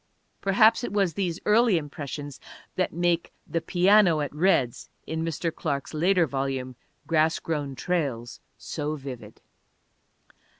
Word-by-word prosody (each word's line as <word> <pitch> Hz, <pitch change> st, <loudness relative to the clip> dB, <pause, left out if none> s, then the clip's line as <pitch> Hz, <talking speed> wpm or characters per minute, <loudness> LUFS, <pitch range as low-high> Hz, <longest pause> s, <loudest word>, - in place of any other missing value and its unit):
Perhaps 215 Hz, +4 st, +4 dB
it -, -, -3 dB
was 195 Hz, -5 st, +1 dB
these 180 Hz, -1 st, -2 dB
early 215 Hz, -2 st, +4 dB
impressions 145 Hz, -1 st, -6 dB, 0.4 s
that 185 Hz, -, 0 dB
make 175 Hz, 0 st, 0 dB
The 165 Hz, -, -2 dB
Piano 180 Hz, -2 st, +4 dB
at 145 Hz, -2 st, -3 dB
Red's 150 Hz, -7 st, +1 dB, 0.2 s
in 160 Hz, 0 st, -3 dB
Mr. 165 Hz, 0 st, -2 dB
Clark's 140 Hz, -3 st, -3 dB
later 175 Hz, +3 st, +3 dB
volume 135 Hz, -2 st, -3 dB, 0.3 s
Grass 160 Hz, 0 st, +2 dB
Grown 145 Hz, -4 st, -3 dB
Trails 135 Hz, -9 st, -2 dB, 0.2 s
so 150 Hz, 0 st, -4 dB
vivid. 135 Hz, -4 st, -9 dB
160 Hz, 125 wpm, -26 LUFS, 140-180 Hz, 0.4 s, Perhaps